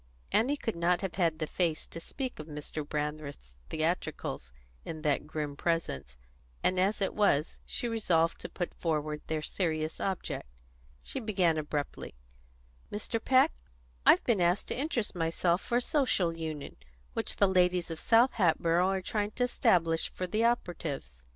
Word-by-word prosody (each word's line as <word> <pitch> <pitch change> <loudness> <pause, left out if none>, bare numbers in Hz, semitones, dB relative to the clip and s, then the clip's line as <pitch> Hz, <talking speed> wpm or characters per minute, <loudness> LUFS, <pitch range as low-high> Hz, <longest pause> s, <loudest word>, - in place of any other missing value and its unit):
Annie 275 +6 +3
could 225 -7 -3
not 175 +1 +2
have 195 -3 -3
had 165 -4 +1
the 155 - -1
face 165 0 0
to 165 - -8
speak 255 - -5
of 155 - -7
Mr. 150 0 -5
Brandreth's 150 - -4 0.2
theatricals 155 - -2 0.3
in 155 -1 -6
that 150 -1 +1
grim 150 -2 -3
presence; 140 - -2 0.5
and 185 0 +2
as 200 +2 +2
it - - 0
was, 165 -8 +2
she 240 - -1
resolved 175 -8 +2
to - - -6
put 175 - -4
forward 155 -2 -1
their 155 -1 -1
serious 155 -4 -1
object. 190 - -2 0.6
She - - -4
began 190 -8 +2
abruptly: 150 - -4 0.8
"Mr. 220 +2 -2
Peck, 265 +4 +5 0.5
I've - - +6
been 225 -7 +2
asked 175 +3 +2
to - - -1
interest 260 -6 -1
myself 170 +1 +1
for 240 - 0
a - - +2
Social 245 - +2
Union 160 -3 -5 0.4
which - - 0
the 200 - +4
ladies 180 -2 +2
of 160 - -5
South 235 +3 +5
Hatboro' 170 -2 +3
are 190 0 0
trying 205 +2 -1
to 250 - 0
establish 165 -9 +2
for 185 - -3
the 215 +5 0
operatives. 155 - -2
170 Hz, 160 wpm, -31 LUFS, 155-205 Hz, 0.8 s, I've